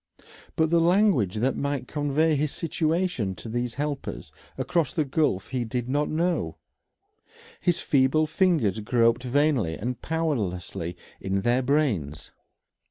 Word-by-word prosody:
But 160 0 +2
the 170 -1 +4
language 170 - +3
that 125 +5 +1
might 140 -3 -2
convey 150 +2 +1
his 145 0 0
situation 160 - -1
to 85 - -9
these 120 +1 -3
helpers 145 0 -4 0.3
across 170 -3 0
the 155 -4 +1
gulf 140 - 0
he 130 -2 -1
did 120 +1 -3
not 145 +3 0
know; 170 +3 -1 1.0
his 175 -2 +1
feeble 140 +2 +3
fingers 155 - +1
groped 115 +2 +2
vainly 130 - +1
and 120 +3 -4
powerlessly 95 - -2 0.2
in 95 0 -1
their 120 +4 +2
brains. 125 - 0
135 Hz, 130 wpm, -26 LUFS, 115-155 Hz, 1.0 s, the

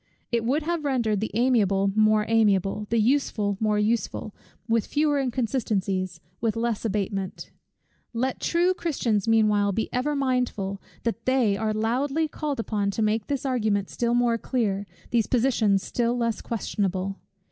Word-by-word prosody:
It 235 -1 +1
would 275 +7 +1
have 335 0 -2
rendered 235 -7 +1
the 220 - -2
amiable 200 -5 +3
more 215 0 +4
amiable, 210 -2 +2
the 230 - +1
useful 220 -4 +1
more 215 -1 +1
useful, 215 0 -1 0.3
with 225 -2 +1
fewer 295 -1 +1
inconsistencies, 210 -8 -1 0.2
with 225 -1 0
less 230 -1 -1
abatement. 195 -3 -3 0.6
Let 250 +2 -1
true 350 +2 +2
Christians 235 - -1
meanwhile 210 -2 +3
be 220 +3 -2
ever 285 +4 0
mindful, 250 -8 -1 0.2
that 230 0 -3
they 255 -6 +3
are 220 +1 -1
loudly 265 +8 0
called 295 -3 -4
upon 210 -3 -1
to 215 +2 -1
make 215 0 0
this 280 -1 -2
argument 215 -6 0
still 235 0 0
more 240 -1 +2
clear, 205 -6 -1 0.2
these 230 -3 +2
positions 225 -6 +2
still 240 0 0
less 230 -2 -1
questionable. 195 -3 -2
225 Hz, 145 wpm, -25 LUFS, 205-250 Hz, 0.6 s, more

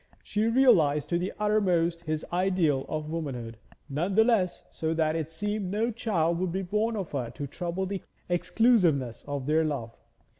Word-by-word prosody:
She 215 +1 0
realised 205 - +4
to 170 - +1
the 180 +2 -2
uttermost 180 -6 +1
his 155 0 -2
ideal 175 -7 +1
of 155 0 -3
womanhood, 125 -9 -4 0.3
none 165 +7 -1
the 220 - +7
less 215 -7 +1
so 160 0 -2
that 160 -1 +1
it 160 -2 -2
seemed 205 +3 -3
no 220 +5 0
child 170 -7 0
would 185 -1 -1
be 190 +2 -2
born 215 +5 0
of 195 -6 -4
her 125 -5 -2
to 145 - -4
trouble 175 +6 -3
the 195 0 -4 0.3
exclusiveness 175 - +2
of 140 -2 -3
their 155 +2 +3
love. 135 -7 -3
170 Hz, 175 wpm, -28 LUFS, 155-200 Hz, 0.3 s, the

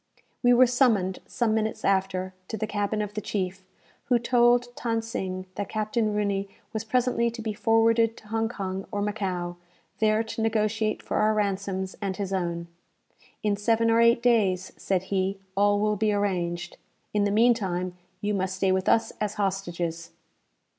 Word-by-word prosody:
We 245 - +5
were 245 +1 +7
summoned, 230 -7 +2
some 235 -3 0
few 220 - +2
minutes 220 0 -2
after, 190 -1 0
to 220 - -4
the 215 - -1
cabin 210 0 -1
of 205 0 -6
the 215 - -3
chief, 190 -2 -3 0.4
who 245 - +3
told 240 0 +3
Than 230 -1 +1
Sing 185 -4 -4
that 200 +1 -4
Captain 215 0 0
Rooney 200 -1 0 0.2
was 220 -1 -2
presently 235 +1 +1
to 235 0 -9
be 220 -1 -3
forwarded 225 +1 +3
to 215 - -15
Hong 225 0 0
Kong 195 -3 -4
or 205 0 -1
Macao, 185 -4 -2 0.4
there 215 0 +3
to 225 +1 -5
negotiate 215 -1 0
for - - -2
our 215 0 +3
ransoms 195 -2 -1
and 195 -2 -2
his 195 -1 -3
own. 170 -2 -2 0.8
"In 210 -1 +2
seven 225 +2 +2
or 230 +1 +4
eight 235 0 +4
days," 195 -7 +2
said 190 -2 -1
he, 190 +1 0 0.2
"all 205 +1 +3
will 210 0 +1
be 215 +1 +2
arranged. 175 -4 -1 0.4
In 205 -1 +2
the - - +2
meantime 200 -5 +2 0.3
you 210 0 0
must 190 -1 -1
stay 190 0 +1
with 190 0 +1
us 225 0 +3
as 210 -1 -1
hostages." 175 -4 -2
210 Hz, 175 wpm, -26 LUFS, 190-225 Hz, 0.8 s, were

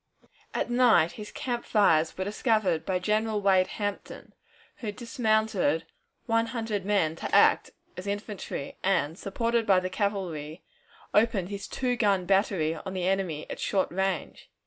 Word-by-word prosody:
At - - -1
night 240 -9 +4
his 210 -1 -9
camp 240 -2 -3
fires 165 -7 +3
were 190 - -1
discovered 205 -5 0
by 185 - +1
General 215 +3 0
Wade 190 -2 +3
Hampton, 205 -1 -5 0.4
who 215 -3 -4
dismounted 220 - 0 0.4
one 230 0 +1
hundred 225 -5 -3
men 180 -7 +2
to - - -2
act - - +5 0.3
as 185 +2 -7
infantry, 205 -7 -5
and, 165 -5 +1
supported 230 +4 -1
by 190 -2 +5
the 185 0 -4
cavalry, 180 -6 -3 0.5
opened 210 -4 +2
his 200 -1 -6
two 250 -1 -1
gun 200 -6 +2
battery 190 -4 +2
upon 190 +4 -7
the 180 -1 -1
enemy 185 -6 -1
at - - -7
short 195 -2 0
range. 190 -1 -3
200 Hz, 145 wpm, -28 LUFS, 185-220 Hz, 0.5 s, act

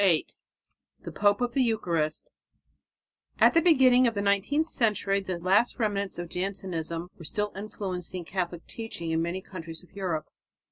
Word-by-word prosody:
VIII 180 -6 +4 0.8
THE - - -6
POPE 205 +2 +2
OF 245 -1 0
THE 270 - +2
EUCHARIST 170 -10 0 1.1
At - - +6
the 330 - +5
beginning 260 -7 +6
of 230 - -1
the 200 - 0
nineteenth 200 +10 +2
century 210 -9 +1
the 185 -2 -3
last 190 +7 +2
remnants 205 -4 -1
of 175 0 -4
Jansenism 180 -2 -3
were - - -9
still 210 +5 -2
influencing 185 -3 -5
Catholic 175 -2 -3
teaching 225 -8 -6
in 160 0 +1
many 170 +3 -2
countries 165 -3 -8
of 180 - -20
Europe. 180 -6 -2
195 Hz, 155 wpm, -28 LUFS, 170-215 Hz, 1.1 s, At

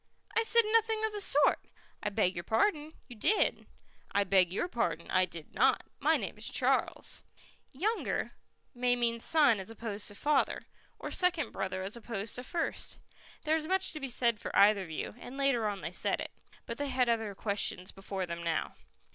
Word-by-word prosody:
"I 455 - +4
said 465 +1 +5
nothing 445 -1 +3
of 440 - -2
the 415 - -3
sort." 295 -6 +5 0.4
"I 210 - -1
beg 200 -3 +1
your 175 - -5
pardon, 300 - +1
you 245 - -11
did." 405 - +1 0.4
"I 200 0 +3
beg 185 -2 +3
your 200 - -1
pardon, 230 - -2
I 185 0 +4
did 165 -3 -11
not. - - +3 0.2
My - - +3
name - - -6
is - - 0
Charles." - - 0 0.5
"Younger" 420 - -1 0.4
may 245 -1 +2
mean 235 -1 0
son 285 -5 +4
as 190 - -5
opposed 220 -2 -4
to 205 - -3
father, 290 +4 +1 0.3
or - - -6
second 340 -8 +1
brother 190 -1 -3
as 195 +4 -3
opposed 225 -2 -5
to 250 - -4
first. 335 +5 -2 0.5
There 310 0 +2
is 310 -1 -2
much 380 0 +2
to 310 - -5
be 275 -2 -4
said 235 -2 +1
for - - -5
either 200 -2 +5
view, 160 - -5
and 250 +2 -9
later 275 -5 +2
on 200 -3 -3
they 165 +2 -4
said - - 0
it. - - -5 0.3
But - - -6
they 285 - -1
had 255 -2 +1
other 225 -3 0
questions 200 -3 -1
before 195 -1 -4
them 170 -1 -5
now. 170 -1 -1
230 Hz, 190 wpm, -31 LUFS, 195-300 Hz, 0.5 s, said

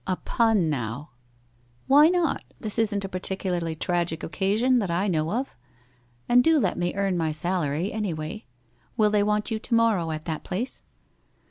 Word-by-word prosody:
' - - -38
( - - -17
A 185 - +1
pun, 220 -4 +1
now! 135 0 -3 0.4
' 120 0 -36
'Why 290 +4 +7
not? 350 -2 +1 0.2
Tins 215 0 -2
isn't 205 -3 0
a - - -3
particularly 180 -3 -3
tragic 170 -1 -1
oc - - -5
<;iHon, 220 +7 +2
that 200 -5 -2
I 175 +4 0
know 160 -4 0
of? 255 +5 -3 0.7
And 245 +1 +5
do 325 +2 +4
lot 285 - +1
me 175 0 -2
earn 195 -2 0
my 160 -2 0
salary, 170 +1 -1
anyway. 190 -2 -4 0.5
Will 210 -1 +3
they 210 -1 +3
want 210 +1 0
you 220 - -1
to 235 - -5
morrow 220 -8 +2
at 155 0 -5
that 160 -2 -4
place?' 220 +8 -3
190 Hz, 190 wpm, -25 LUFS, 160-220 Hz, 0.7 s, Why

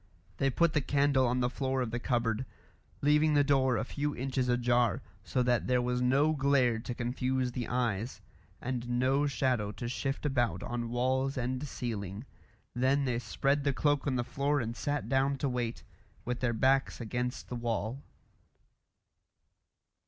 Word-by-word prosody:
They 135 - +2
put 165 +5 +2
the 150 - +2
candle 140 -2 +2
on 125 +1 +1
the 125 - +2
floor 135 -1 -1
of 115 - -4
the 120 - -2
cupboard, 120 -2 0 0.6
leaving 150 +1 +4
the 145 - +5
door 135 -3 +3
a 110 - 0
few 145 +3 -3
inches 130 0 -1
ajar, 120 -3 +2 0.2
so 125 - 0
that 120 -1 +1
there 125 0 +3
was 125 0 0
no 135 +5 +3
glare 135 -5 +2
to 120 +2 -5
confuse 125 +1 -1
the 120 -2 -4
eyes, 120 -2 -1 0.4
and 125 -1 -4
no 130 +4 +2
shadow 125 -7 0
to 120 - -5
shift 135 +4 -3
about 125 -5 0
on 120 -1 -3
walls 130 +3 0
and 130 +3 -2
ceiling. 105 -4 -5 0.5
Then 135 +3 +2
they 120 -2 0
spread 140 +3 0
the 140 -1 +1
cloak 145 +1 +1
on 135 - +1
the 120 - 0
floor 140 +3 0
and 115 -2 -3
sat 145 0 -2
down 135 +2 +2
to 140 - -1
wait, 120 -2 -2 0.4
with 125 0 -2
their 125 -2 +1
backs 135 +4 +2
against 125 +1 -3
the 125 - -4
wall. 120 +1 -2
125 Hz, 165 wpm, -31 LUFS, 120-135 Hz, 0.6 s, the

